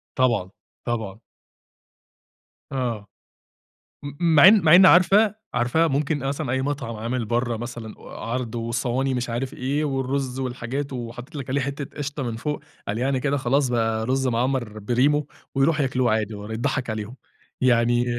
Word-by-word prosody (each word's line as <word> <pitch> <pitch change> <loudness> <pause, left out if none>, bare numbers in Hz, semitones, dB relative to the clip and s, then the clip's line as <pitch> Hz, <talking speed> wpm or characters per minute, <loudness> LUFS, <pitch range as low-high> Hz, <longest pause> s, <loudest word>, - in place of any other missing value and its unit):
طبعًا. 120 -8 +1 0.4
طبعًا. 110 -4 -3 1.5
آه. 120 -6 -2 1.0
م 145 - -5 0.2
مع 150 +4 +9
إن 210 -1 +7
مع 160 0 +6
إن 185 +1 +9
عارفة، 195 +5 +5 0.2
عارفة؟ 125 +7 +2
ممكن 145 +1 0
أصلًا 140 0 -2
أي 130 0 0
مطعم 135 -5 -3
عامل 115 +2 -2
برا 120 +1 -1
مثلًا 120 -1 -7
و - - -13
عرض 120 0 -4
وصواني 120 +3 -1
مش 125 -1 -2
عارف 130 +3 -3
إيه 140 +4 -1
والرز 135 -1 -2
والحاجات 130 +2 -4
وحطيت 125 +5 -7
لِك 135 -3 -6
عليه 140 +2 +1
حتة 140 +1 -5
قشطة 145 0 -3
من 120 -3 -3
فوق، 150 +5 -3 0.3
قال 105 +3 -2
يعني 130 +1 0
كده 140 +2 0
خلاص 135 +1 +1
بقى 115 -2 0
رز 135 +1 +1
مَعمّر 120 -2 -1
بريمو، 135 +7 +2 0.3
ويرُوح 150 +3 +2
ياكلوه 130 -4 +1
عادي 110 -1 -1
والّا 105 +2 -6
اضّحك 125 0 -1
عليهم. 110 +3 -5 0.4
يعني 120 -1 +3
130 Hz, 155 wpm, -24 LUFS, 115-140 Hz, 1.5 s, مع